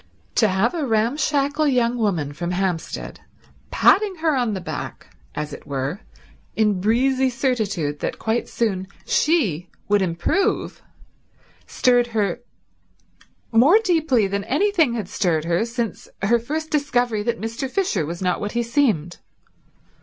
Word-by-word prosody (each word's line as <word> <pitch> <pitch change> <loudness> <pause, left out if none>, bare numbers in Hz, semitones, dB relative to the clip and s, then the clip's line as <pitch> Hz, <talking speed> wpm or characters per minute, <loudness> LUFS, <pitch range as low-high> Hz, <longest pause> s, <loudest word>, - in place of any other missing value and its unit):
To 220 - +4
have 195 +4 +1
a 330 -3 -2
ramshackle 280 +5 +1
young 245 -3 +2
woman 175 -11 -1
from 170 +4 -4
Hampstead 180 -2 -3 0.5
patting 405 -2 +4
her 320 -3 +1
on 240 -5 0
the - - -3
back 175 - -7 0.2
as 150 -1 -4
it - - -10
were, 140 +6 -3 0.6
in 210 -4 +2
breezy 260 +5 +2
certitude 215 - -1
that - - -3
quite 225 +2 -1
soon 195 -5 -1 0.2
she 195 - +1 0.2
would 205 0 +3
improve, 180 - 0 0.9
stirred 245 -1 +3
her 200 +1 0 1.1
more 260 - +6
deeply 320 - +2
than 200 +1 -2
anything 325 -4 +2
had 215 -6 -3
stirred 165 -5 0
her 170 +6 +1
since 230 -1 -4
her 235 +4 +3
first 310 +7 -4
discovery 245 -7 +1
that 230 +2 -2
Mr. 230 +4 -4
Fisher 265 - 0
was 170 +4 -5
not 180 -1 0
what 205 - -3
he 240 0 0
seemed. 225 - 0
230 Hz, 140 wpm, -22 LUFS, 185-270 Hz, 1.1 s, more